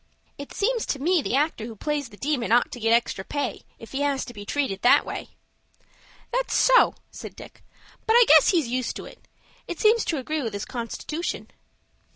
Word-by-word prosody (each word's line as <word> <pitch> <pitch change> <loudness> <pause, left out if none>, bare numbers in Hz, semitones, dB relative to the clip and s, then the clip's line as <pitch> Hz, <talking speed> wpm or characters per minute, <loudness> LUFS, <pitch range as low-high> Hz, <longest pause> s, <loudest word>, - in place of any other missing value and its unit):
"It 285 - -8
seems 465 +2 -1
to 280 - -2
me 340 +4 +2
the 260 - -1
actor 285 -6 0
who 230 - -9
plays 295 +4 -3
the 205 - -15
Demon 270 -4 -1
ought 240 +1 +3
to 245 - -7
get 225 0 +1
extra 230 -4 +1
pay, 285 +7 -3 0.2
if 225 - -13
he 275 - -3
has 280 -2 0
to 240 - -10
be 205 -2 -10
treated 265 -10 -1
that 245 - +5
way." - - -6 1.0
"That's - - 0
so," - - +5 0.2
said - - -9
Dick; - - -13 0.4
"but 445 - +4
I 480 0 +8
guess - - +7
he's 330 -9 +2
used 250 0 -2
to - - -7
it. - - -15 0.4
It 350 - -6
seems 445 +1 +4
to 320 - -1
agree 305 +4 -3
with 225 -5 -4
his 200 0 -4
constitution." 260 +7 -5
280 Hz, 200 wpm, -25 LUFS, 235-330 Hz, 1.0 s, I